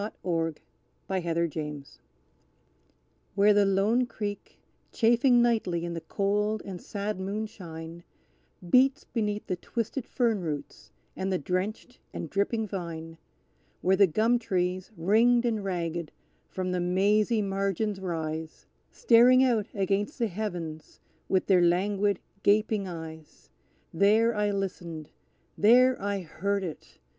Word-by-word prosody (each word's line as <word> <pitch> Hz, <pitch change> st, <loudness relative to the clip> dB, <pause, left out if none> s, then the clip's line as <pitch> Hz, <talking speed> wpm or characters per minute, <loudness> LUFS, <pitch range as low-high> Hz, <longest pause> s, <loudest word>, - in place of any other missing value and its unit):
The 210 Hz, -, -4 dB
Wail 165 Hz, -3 st, 0 dB
in 160 Hz, -, -6 dB, 0.5 s
the 190 Hz, -1 st, -1 dB
Native 170 Hz, -2 st, -1 dB
Oak 150 Hz, -2 st, -5 dB, 1.5 s
Where 205 Hz, +1 st, +5 dB
the 205 Hz, -1 st, +4 dB
lone 210 Hz, +6 st, +2 dB
creek, 205 Hz, -3 st, -6 dB, 0.3 s
chafing 240 Hz, +1 st, +4 dB
nightly 185 Hz, -8 st, 0 dB
in 170 Hz, -, -4 dB
the 165 Hz, -, -5 dB
cold 210 Hz, +3 st, -1 dB
and 185 Hz, -3 st, -7 dB
sad 205 Hz, -1 st, -4 dB
moonshine, 185 Hz, -5 st, -6 dB, 0.6 s
Beats 265 Hz, -, +4 dB
beneath 210 Hz, -3 st, -2 dB
the 185 Hz, -, -2 dB
twisted 230 Hz, +6 st, -4 dB
fern 230 Hz, -6 st, 0 dB
roots 150 Hz, -4 st, -6 dB, 0.2 s
and 190 Hz, +1 st, -2 dB
the 185 Hz, -, +1 dB
drenched 190 Hz, -, -3 dB, 0.2 s
and 160 Hz, -, -5 dB
dripping 215 Hz, +3 st, 0 dB
vine; 165 Hz, -4 st, -6 dB, 0.6 s
Where 190 Hz, +1 st, +3 dB
the 200 Hz, 0 st, +5 dB
gum 225 Hz, +8 st, +2 dB
trees, 185 Hz, -4 st, -1 dB
ringed 230 Hz, +8 st, +3 dB
and 220 Hz, -3 st, 0 dB
ragged, 170 Hz, -4 st, -3 dB, 0.4 s
from 185 Hz, -1 st, -3 dB
the 180 Hz, -1 st, -1 dB
mazy 205 Hz, +5 st, +2 dB
margins 195 Hz, +1 st, -1 dB
rise, 160 Hz, -3 st, -4 dB, 0.2 s
Staring 250 Hz, +2 st, +5 dB
out 230 Hz, -6 st, +2 dB
against 200 Hz, +5 st, -1 dB
the 240 Hz, -, +1 dB
heavens 175 Hz, -6 st, -6 dB, 0.3 s
with 190 Hz, -, +2 dB
their 185 Hz, -3 st, +4 dB
languid 195 Hz, +3 st, +2 dB, 0.2 s
gaping 210 Hz, -1 st, +2 dB
eyes; 160 Hz, -3 st, -10 dB, 0.4 s
There 215 Hz, +6 st, +4 dB
I 210 Hz, -1 st, 0 dB
listened 175 Hz, -6 st, -4 dB, 0.4 s
there 250 Hz, +5 st, +5 dB
I 200 Hz, 0 st, -2 dB
heard 195 Hz, +4 st, -2 dB
it! 165 Hz, -4 st, -8 dB
195 Hz, 130 wpm, -28 LUFS, 175-215 Hz, 1.5 s, Where